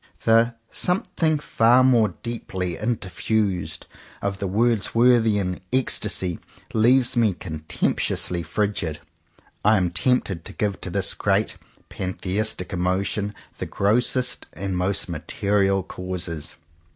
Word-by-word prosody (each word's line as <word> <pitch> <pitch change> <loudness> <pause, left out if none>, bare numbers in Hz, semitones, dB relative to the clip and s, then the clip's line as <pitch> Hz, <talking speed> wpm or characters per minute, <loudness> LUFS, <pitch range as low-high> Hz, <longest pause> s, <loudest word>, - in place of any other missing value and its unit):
The 115 +1 +4 0.2
"something 165 -3 +1
far 125 -3 +4
more 120 -5 +4
deeply 95 -7 -3
interfused" 100 -5 -1 0.3
of 100 -1 -3
the 100 - -2
Words 110 +2 +1
worthian 110 -6 +3
ecstasy 95 -8 0 0.3
leaves 125 +3 +4
me 115 -4 +3
contemptuously 85 +1 -2
frigid. 85 -3 -2 0.6
I 105 +1 +5
am 90 -2 +1
tempted 95 -4 0
to - - -8
give 100 -2 -2
to - - -5
this - - +1
great - - +1 0.3
pantheistic 95 +1 -1
emotion 95 +3 -1 0.2
the - - -3
grossest 120 +5 +1
and 95 +3 -3
most 95 +2 0
material 95 +3 0
causes. 85 -4 -5
100 Hz, 110 wpm, -24 LUFS, 90-115 Hz, 0.6 s, I